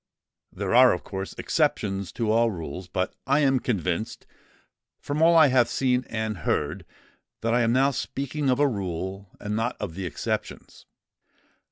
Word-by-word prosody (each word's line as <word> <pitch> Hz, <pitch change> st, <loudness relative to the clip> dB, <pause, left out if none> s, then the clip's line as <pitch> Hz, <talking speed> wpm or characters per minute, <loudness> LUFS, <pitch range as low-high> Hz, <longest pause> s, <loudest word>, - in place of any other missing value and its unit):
There -, -, -3 dB
are, -, -, +7 dB
of -, -, -4 dB
course, 95 Hz, 0 st, -6 dB
exceptions 95 Hz, -2 st, 0 dB
to 115 Hz, -3 st, 0 dB
all 115 Hz, +1 st, +3 dB
rules; 90 Hz, -1 st, -6 dB
but 90 Hz, +1 st, -2 dB
I 140 Hz, +3 st, +3 dB
am 135 Hz, -2 st, +3 dB
convinced, 100 Hz, -3 st, -2 dB, 0.7 s
from 145 Hz, +2 st, -3 dB
all 170 Hz, +1 st, +6 dB
I 155 Hz, -3 st, +7 dB
have 125 Hz, -2 st, +3 dB
seen 125 Hz, 0 st, +1 dB
and 110 Hz, -3 st, -3 dB
heard, -, -, -2 dB, 0.5 s
that 115 Hz, 0 st, 0 dB
I 120 Hz, -, +3 dB
am 115 Hz, -1 st, +2 dB
now 135 Hz, +3 st, +3 dB
speaking 140 Hz, +2 st, -3 dB
of 125 Hz, -, +2 dB
a 145 Hz, -, +5 dB
rule, 95 Hz, -3 st, -4 dB
and 105 Hz, 0 st, -3 dB
not 115 Hz, +3 st, -1 dB
of 95 Hz, -5 st, -4 dB
the 95 Hz, +1 st, -4 dB
exceptions. 80 Hz, -, -5 dB
115 Hz, 165 wpm, -25 LUFS, 95-130 Hz, 0.7 s, are